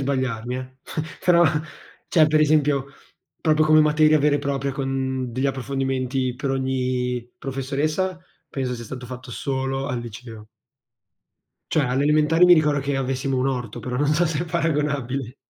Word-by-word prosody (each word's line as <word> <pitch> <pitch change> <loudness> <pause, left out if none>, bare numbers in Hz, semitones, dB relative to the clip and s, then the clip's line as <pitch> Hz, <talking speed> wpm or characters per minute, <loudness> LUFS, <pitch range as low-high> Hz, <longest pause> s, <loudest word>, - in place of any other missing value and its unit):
sbagliarmi, 130 -3 -2
eh, 130 0 -5 0.6
però, 175 -1 +5 0.6
cioè, 155 -3 +5
per 155 0 +3
esempio, 145 -3 +3 0.5
proprio 155 -1 +3
come 155 0 +6
materia 155 0 +4
vera 145 0 +3
e - - -3
propria 140 -1 -2
con, 130 -2 -2
degli 130 +4 0
approfondimenti 130 -1 -1
per 135 +2 -3
ogni 125 -2 -1
professoressa, 145 +7 -2 0.3
penso 130 -2 -3
sia 120 -1 -7
stato 125 +2 -8
fatto 125 0 -9
solo 135 +1 -2
al 125 -4 -2
liceo. 115 -1 -10 1.2
Cioè, 155 - +2
alle 130 +2 0
elementari 155 +3 +4
mi 180 - +8
ricordo 150 -3 +2
che 140 0 -2
avessimo 135 0 -1
un 130 - +1
orto, 125 -5 -3
però 125 -1 -4
non 145 +2 +2
so 170 +3 +2
se 155 -2 -1
è - - -4
paragonabile. 145 -6 -1
135 Hz, 155 wpm, -23 LUFS, 130-150 Hz, 1.2 s, mi